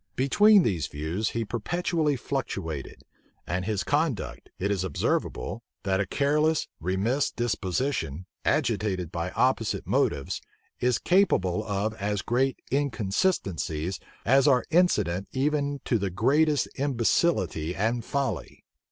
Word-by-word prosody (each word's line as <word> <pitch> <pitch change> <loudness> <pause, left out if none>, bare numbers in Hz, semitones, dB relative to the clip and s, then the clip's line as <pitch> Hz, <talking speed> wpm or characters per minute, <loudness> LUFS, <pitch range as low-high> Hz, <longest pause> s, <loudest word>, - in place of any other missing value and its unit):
Between 205 +10 +5
these 90 - 0
views, 80 +9 -2
he 115 -1 -2
perpetually 155 - 0
fluctuated; 100 - -4 0.4
and 90 +2 -2
from - - -3
his 105 -2 -1
conduct, 145 - -1
it 100 +2 -1
is 95 -2 0
observable, 95 +3 -1 0.2
that 95 -1 +1
a 100 - 0
careless, 150 +5 +1
remiss 100 - 0
disposition, 100 - -2 0.2
agitated 105 - 0
by 85 0 -2
opposite 125 0 0
motives, - - 0 0.4
is 125 -2 +2
capable 110 - +2
of 105 0 -1
as 105 0 -1
great 130 +2 +1
inconsistencies 100 - 0 0.3
as 135 +4 +5
are 130 -3 +4
incident 105 - +2
even 145 +1 0
to 115 - +1
the 100 -1 -1
greatest 145 - +2
imbecility 115 - +1
and 115 +5 0
folly. 140 +2 -3
115 Hz, 120 wpm, -27 LUFS, 95-140 Hz, 0.4 s, Between